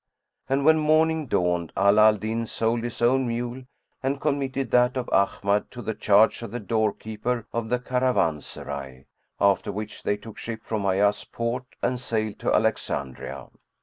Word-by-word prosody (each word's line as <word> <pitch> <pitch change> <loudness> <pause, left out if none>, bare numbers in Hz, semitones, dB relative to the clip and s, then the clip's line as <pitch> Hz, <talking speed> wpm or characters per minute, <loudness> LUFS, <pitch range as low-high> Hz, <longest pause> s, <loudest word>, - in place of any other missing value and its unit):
And 135 +1 +1
when 160 0 +6
morning 155 0 +2
dawned, 90 -5 0
Ala 100 +2 +6
al 105 0 +4
Din 110 +2 -3
sold 115 +1 0
his 120 0 -4
own 130 +2 +3
mule 120 +2 -3 0.4
and 135 +1 -1
committed 135 -4 -1
that 125 +1 +4
of 125 - -2
Ahmad 100 +1 +1
to 120 - -9
the 110 - -2
charge 105 +2 +4
of 115 - -6
the 120 +4 -5
door 110 0 +1
keeper 110 +3 -4
of 115 -1 -2
the 125 - +2
caravanserai, 75 - -2 0.3
after 100 0 +2
which 105 +1 -6
they 105 - 0
took 105 +1 -11
ship 110 -1 -6
from 105 -3 -2
Ayas 100 +2 +2
port 115 +2 -3 0.2
and 125 0 0
sailed 110 -4 -2
to - - 0
Alexandria. 65 -2 -1
115 Hz, 165 wpm, -25 LUFS, 105-125 Hz, 0.4 s, when